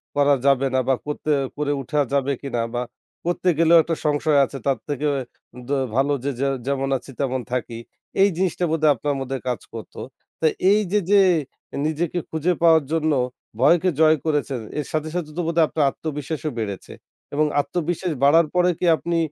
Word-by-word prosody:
করা 145 0 +4
যাবে 135 -1 +4
না, 130 - +4
বা 135 - +3
করতে 150 +1 -3 0.3
করে 145 -1 -1
উঠা 150 +3 -2
যাবে 140 0 +1
কিনা 130 -4 -2
বা 120 - -1 0.4
করতে 175 +1 0
গেলেও 165 0 +6
একটা 165 0 -2
সংশয় 150 0 +2
আছে 135 - -8
তার 135 - +1
থেকে 145 +1 -1 0.6
দ - - -13 0.3
ভালো 140 +2 +2
যে 140 - -1
যে 140 - +1 0.2
যেমন 135 -1 -1
আছি 130 - -13
তেমন 130 -2 -1
থাকি। 120 -2 -3 0.4
এই 200 - +6
জিনিসটা 180 -1 0
বোধহয় 155 -2 +4
আপনার 145 +4 -2
মধ্যে 135 0 -3
কাজ 125 -6 -1
করত। - - -8 0.5
তো 160 - +1 0.3
এই 210 - +5
যে 210 - +3
যে 200 -1 +7 0.6
নিজেকে 160 +3 -1
খুঁজে 160 +3 0
পাওয়ার 165 -2 +5
জন্য 160 -1 +1 0.5
ভয়কে 170 +7 +4
জয় 155 0 +6
করেছেন 145 -5 0 0.2
এর 145 - -2
সাথে, 155 0 -2
সাথে 165 -4 -2
তো - - +1
বোধহয় 165 -1 +3
আপনার 150 +2 +1
আত্মবিশ্বাসও 155 +1 -4
বেড়েছে 100 -3 -5 0.4
এবং 155 +1 +2 0.2
আত্মবিশ্বাস 175 +2 -2
বাড়ার 160 +3 +5
পরে 180 0 +4
কি - - -1
আপনি 170 +1 -2
150 Hz, 175 wpm, -22 LUFS, 140-165 Hz, 0.6 s, যে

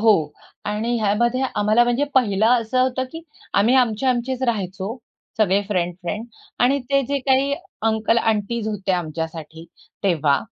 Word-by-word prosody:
हो 220 -1 +6 0.5
आणि 220 +3 -1
ह्यामध्ये 235 +5 +1
आम्हाला 215 +3 +3
म्हणजे 245 +4 +1
पहिलं 215 -4 +3
असं 255 +3 0
होतं, 260 0 0
की 325 0 -7 0.3
आम्ही 225 +6 +4
आमचे 245 0 +2
आमचेच 255 +1 0
राहायचो. 200 -1 -2 0.4
सगळे 200 -1 +3
फ्रेंड, 180 -3 0
फ्रेंड 205 +6 -3 0.4
आणि 265 +3 +4
ते 275 0 +3
जे 280 0 0
काही 270 +1 +3 0.3
अंकल 225 +1 +2
आंटीज 220 0 -1
होते 195 -3 -2
आमच्यासाठी 160 -1 -4 0.4
तेव्हा. 155 -6 +3
220 Hz, 145 wpm, -22 LUFS, 195-250 Hz, 0.5 s, हो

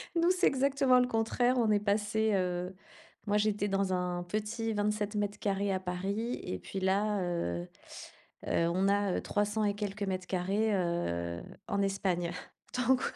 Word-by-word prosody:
Nous, 335 +1 +4
c'est 370 - +2
exactement 270 -1 +4
le 250 - +3
contraire. 245 +2 +1
On 225 -3 +3
est 205 - +4
passés, 210 +1 +1
heu, 180 0 -1 0.5
moi 205 0 +3
j'étais 210 -1 +1
dans 195 -1 +1
un 180 -1 -1
petit 215 +4 -2
27 210 0 -1
mètres 205 0 -1
carrés 200 0 0
à 190 - 0
Paris 195 +6 -3
et 90 - -4
puis 195 - -5
là, 200 +2 +2
heu 90 - -2 0.8
heu, 165 - +2
on 185 +3 +1
a, 200 -1 +2
heu, - - -2
300 210 +1 0
et 205 - +2
quelques 205 0 -3
mètres 185 -2 -2
carrés, 195 +4 +1
heu, 85 - -1 0.3
en 200 - +1
Espagne 185 -3 0 0.5
donc 255 +1 +3
205 Hz, 165 wpm, -31 LUFS, 185-215 Hz, 0.8 s, Nous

